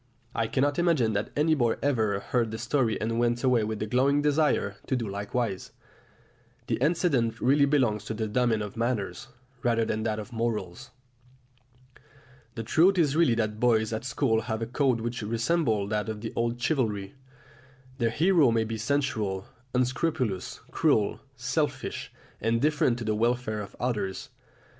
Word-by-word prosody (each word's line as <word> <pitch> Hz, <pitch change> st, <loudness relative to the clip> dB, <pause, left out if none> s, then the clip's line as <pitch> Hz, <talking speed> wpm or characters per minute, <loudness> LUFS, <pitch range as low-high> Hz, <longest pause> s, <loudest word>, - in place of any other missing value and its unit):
I 115 Hz, -, 0 dB
cannot 140 Hz, +6 st, +1 dB
imagine 155 Hz, -11 st, +2 dB
that 105 Hz, +1 st, -1 dB
any 155 Hz, +2 st, +3 dB
boy 120 Hz, -6 st, +2 dB
ever 110 Hz, -8 st, +1 dB
heard 120 Hz, -3 st, 0 dB
the 110 Hz, -, -5 dB
story 120 Hz, -1 st, 0 dB
and 115 Hz, +2 st, -1 dB
went 120 Hz, +1 st, +1 dB
away 125 Hz, -4 st, +3 dB
with 110 Hz, 0 st, -3 dB
a -, -, -1 dB
glowing 135 Hz, +6 st, +2 dB
desire 145 Hz, -9 st, +1 dB
to 130 Hz, -, +1 dB
do 120 Hz, -3 st, -2 dB
likewise. 100 Hz, +1 st, -3 dB, 0.9 s
The -, -, -1 dB
incident 140 Hz, -5 st, +1 dB
really 140 Hz, +2 st, +4 dB
belongs 125 Hz, -8 st, +1 dB
to 110 Hz, -, -4 dB
the 110 Hz, 0 st, -2 dB
domain 115 Hz, -1 st, +1 dB
of 105 Hz, -1 st, -7 dB
manners 115 Hz, -3 st, -2 dB, 0.3 s
rather 115 Hz, -3 st, +2 dB
than 110 Hz, -, -1 dB
to -, -, -3 dB
that 110 Hz, -1 st, 0 dB
of 110 Hz, +2 st, -7 dB
morals. 115 Hz, 0 st, -3 dB, 1.7 s
The 115 Hz, -, -4 dB
truth 175 Hz, -, +4 dB
is 150 Hz, -5 st, +3 dB
really 160 Hz, -8 st, +4 dB
that 110 Hz, -2 st, -1 dB
boys 110 Hz, -2 st, +2 dB
at 110 Hz, -, -3 dB
school 125 Hz, -3 st, +1 dB
have 110 Hz, -1 st, -3 dB
a -, -, -1 dB
code 125 Hz, 0 st, +1 dB
which 120 Hz, +1 st, -3 dB
resembles 115 Hz, -1 st, 0 dB
that 105 Hz, 0 st, -1 dB
of 110 Hz, -1 st, -5 dB
the 110 Hz, -, -5 dB
old 115 Hz, +1 st, -1 dB
chivalry. 110 Hz, -8 st, -1 dB, 0.9 s
The 115 Hz, -2 st, +2 dB
hero 160 Hz, +2 st, +4 dB
may 115 Hz, -1 st, +2 dB
be 110 Hz, 0 st, -4 dB
sensual, 110 Hz, -7 st, -1 dB, 0.3 s
unscrupulous, 130 Hz, -, -1 dB
cruel, 105 Hz, -2 st, +2 dB, 0.2 s
selfish, 130 Hz, +5 st, -2 dB, 0.3 s
indifferent 120 Hz, +3 st, +2 dB
to 120 Hz, -, -5 dB
the 110 Hz, -1 st, 0 dB
welfare 115 Hz, -1 st, 0 dB
of 100 Hz, -, -9 dB
others. 105 Hz, -6 st, -2 dB
115 Hz, 160 wpm, -27 LUFS, 110-135 Hz, 1.7 s, really